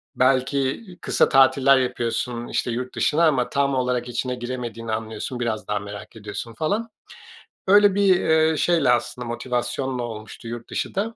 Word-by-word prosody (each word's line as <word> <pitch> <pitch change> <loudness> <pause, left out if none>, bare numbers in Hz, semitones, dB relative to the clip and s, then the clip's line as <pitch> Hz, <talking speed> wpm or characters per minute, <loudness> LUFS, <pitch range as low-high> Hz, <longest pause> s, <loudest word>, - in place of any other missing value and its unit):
belki 130 - +1 0.2
kısa - - +2
tatiller 135 0 +5
yapıyorsun, 120 -1 -2
işte, 120 - -1
yurt 125 +2 -4
dışına 165 +3 +2
ama 130 -5 +1
tam 140 -1 +1
olarak 125 -1 -1
içine 125 +1 -2
giremediğini 120 -2 -5
anlıyorsun. 110 +3 -4
Biraz 115 -3 -2
daha 105 0 -1
merak 100 +2 -9
ediyorsun 110 +2 -7
falan. 205 - -1 0.8
Öyle 205 0 +6
bir, 195 -3 +4
ııı, 160 0 +4
şeyle 165 -6 +2
aslında 125 0 0
motivasyonla 125 +1 -2
olmuştu 110 0 -8
yurt 120 0 -7
dışı - - -3
da. 220 +4 -2
125 Hz, 150 wpm, -23 LUFS, 120-140 Hz, 0.8 s, Öyle